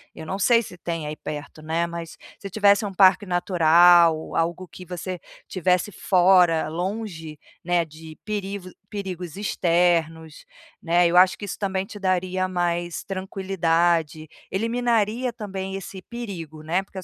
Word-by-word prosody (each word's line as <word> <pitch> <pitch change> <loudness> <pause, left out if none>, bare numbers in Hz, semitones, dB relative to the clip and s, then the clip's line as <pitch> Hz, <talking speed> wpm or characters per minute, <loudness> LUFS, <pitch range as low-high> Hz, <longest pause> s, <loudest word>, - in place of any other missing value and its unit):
eu 160 - -9
não 190 +4 -4
sei 230 +3 +4
se 180 - -11
tem 165 -3 -4
aí 150 - -5
perto, 150 +1 -7
né, 160 +2 -1
mas 170 -1 -7 0.2
se 195 - -7
tivesse 200 +1 +3
um 200 - -5
parque 190 +2 +5
natural, 175 -2 +4
algo 170 +3 -1
que 180 - -12
você 180 +1 -6 0.3
estivesse 180 +2 0
fora, 180 -5 +3
longe, 175 -2 -5 0.3
né, 175 0 +2
de 155 0 -13
perivo 200 -3 -4 0.2
perigos 185 -5 -6
externos, 170 -5 0 0.4
né, 175 +1 +3
eu 170 +1 +2
acho 185 +1 +6
que - - -11
isso 200 - -6
também 190 -2 -1
te 205 +1 -10
daria 185 -1 0
mais 175 -1 -2
tranquilidade, 170 -5 -1 0.2
eliminaria 230 +2 0
também 195 -3 -5
esse 195 0 -8
perigo, 180 -10 -8
né, 170 +4 0
porque 195 0 -9
a - - -9
180 Hz, 150 wpm, -24 LUFS, 165-195 Hz, 0.4 s, acho